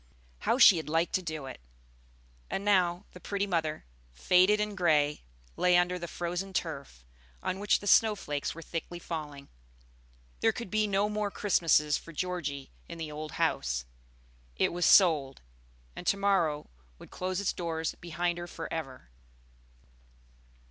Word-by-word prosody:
how 235 - +1
she 205 -8 +8
had 160 - -5
liked 165 +2 +1
to 185 - +1
do 155 -5 -5
it! 130 - -9 0.9
And 195 - -3
now, 185 -2 +2
the 180 - -12
pretty 200 +2 -2
mother, 160 -5 -2 0.3
faded 185 - +4
and 210 -1 -2
gray, 150 -5 +2 0.3
lay 180 -1 +4
under 180 +1 +1
the 170 - -5
frozen 175 +3 -4
turf, 140 - -5 0.4
on 190 - -2
which 205 0 +2
the - - -9
snow 215 +1 +5
flakes 145 -7 -4
were 165 - -9
thickly 170 +2 -5
falling. 150 -5 -6 0.9
There - - +3
could 235 -6 -7
be 215 0 +2
no 200 +1 +1
more 210 -1 -2
Christmases 165 -7 +2
for 165 - -12
Georgie 150 -6 -4 0.2
in 170 - -7
the 160 -2 -5
old 150 0 -7
house; - - 0 0.7
it - - +1
was 175 0 +1
sold, 150 - +4 0.5
and - - -8
to 200 - +3
morrow 175 - +1 0.3
would - - -14
close 185 0 -3
its 200 - 0
doors 165 -2 -3
behind 175 0 -3
her 175 - -6
forever. 155 - -7
175 Hz, 155 wpm, -30 LUFS, 150-190 Hz, 0.9 s, she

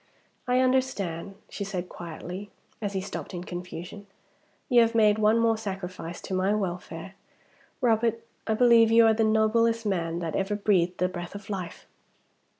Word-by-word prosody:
"I 250 +1 +3
understand," 205 -9 0
she 200 - -5
said 185 -2 -4
quietly, 175 +4 -8 0.3
as 205 -2 -3
he 190 - -1
stopped 195 -1 -6
in 175 - -5
confusion. 180 +2 -8 0.6
"You 245 -3 +6
have 230 0 +2
made 215 -1 +4
one 215 +1 +4
more 230 -1 +2
sacrifice 185 -4 -6
to - - -6
my 190 +3 +2
welfare. 180 -2 -4 0.7
Robert! 230 -1 +1 0.2
I 220 - +2
believe 235 -1 +6
you 230 0 +6
are 225 - +5
the 225 +1 +1
noblest 225 +1 +2
man 170 -4 -1
that 165 -2 -3
ever 195 +2 0
breathed 185 -4 +1
the 180 - +2
breath 175 0 -7
of 205 +1 -8
life!" 185 -4 -5
205 Hz, 160 wpm, -27 LUFS, 180-225 Hz, 0.7 s, You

